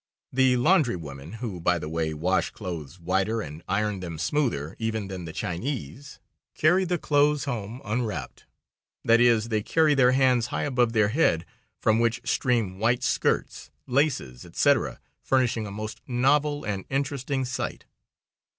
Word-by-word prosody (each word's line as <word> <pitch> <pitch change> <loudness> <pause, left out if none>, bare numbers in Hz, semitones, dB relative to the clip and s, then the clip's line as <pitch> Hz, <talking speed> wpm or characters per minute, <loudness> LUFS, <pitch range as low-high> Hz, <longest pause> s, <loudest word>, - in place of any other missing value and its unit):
The 130 -1 +4
laundry 140 - +3
women, 75 0 -8
who, 110 -5 -5
by 90 +1 +2
the 75 - -5
way, 80 0 -1
wash 90 +5 0
clothes 85 -5 -7
whiter 95 +6 0
and 75 -3 -7
iron 100 0 0
them 85 -3 -6
smoother 85 - -1
even 110 -3 -2
than 90 -2 -6
the 80 - -6
Chinese, 110 - -5 0.4
carry 180 +4 +3
the 175 0 0
clothes 145 -2 +2
home 120 -2 -5
unwrapped. 110 0 -3 0.6
That 115 +1 +5
is, 115 -2 +4
they 110 -2 +1
carry 155 +6 +3
their 130 -2 +4
hands 130 -3 +3
high - - -2
above 125 -5 +1
their 105 -3 +3
head, 110 - +2 0.3
from 110 0 +2
which 120 +1 0
stream 115 -9 0
white 120 +3 +1
skirts, 135 - 0 0.2
laces, 125 - 0
etc., - - +1 0.2
furnishing 125 -4 +1
a - - -7
most 110 +1 -6
novel 145 +4 +2
and 100 -2 -3
interesting 135 -1 -1
sight. 125 0 -4
115 Hz, 150 wpm, -26 LUFS, 95-130 Hz, 0.6 s, That